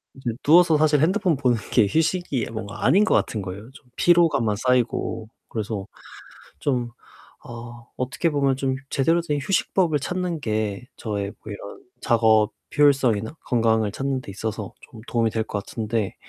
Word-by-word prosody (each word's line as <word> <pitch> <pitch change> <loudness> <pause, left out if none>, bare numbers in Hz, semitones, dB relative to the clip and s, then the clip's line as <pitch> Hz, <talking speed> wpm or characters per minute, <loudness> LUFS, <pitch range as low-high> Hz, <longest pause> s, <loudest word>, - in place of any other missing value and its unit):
이제 130 -3 -3
누워서 165 +1 +6
사실 150 -1 +3
핸드폰 185 -1 +2
보는 125 -4 +2
게 115 - +5
휴식이 160 - 0
뭔가 105 -3 -6
아닌 190 - +5
것 - - +1
같은 105 -3 0
거에요 100 +5 -8 0.3
피로감만 155 -11 +3
쌓이고. 120 -2 0 0.2
그래서 105 -3 -4 0.7
좀 125 -4 -1 0.5
어 120 0 -10
어떻게 135 +6 -1
보면 140 -2 +2
좀 130 -1 -1
제대로 165 +6 +2
된 150 -3 -2
휴식법을 170 0 +1
찾는 180 +3 -3
게 110 -2 -2
저의 100 -2 -3
뭐 105 - -6
이런 100 0 -9 0.2
작업 110 -2 +3 0.3
효율성이나 135 -6 +3
건강을 110 -3 +2
찾는데 130 0 -3
있어서 105 +1 -5
좀 110 - -14
도움이 115 -2 +1
될 110 0 -1
것 105 - -4
같은데 110 -3 -2
120 Hz, 315 characters per minute, -23 LUFS, 110-150 Hz, 0.7 s, 누워서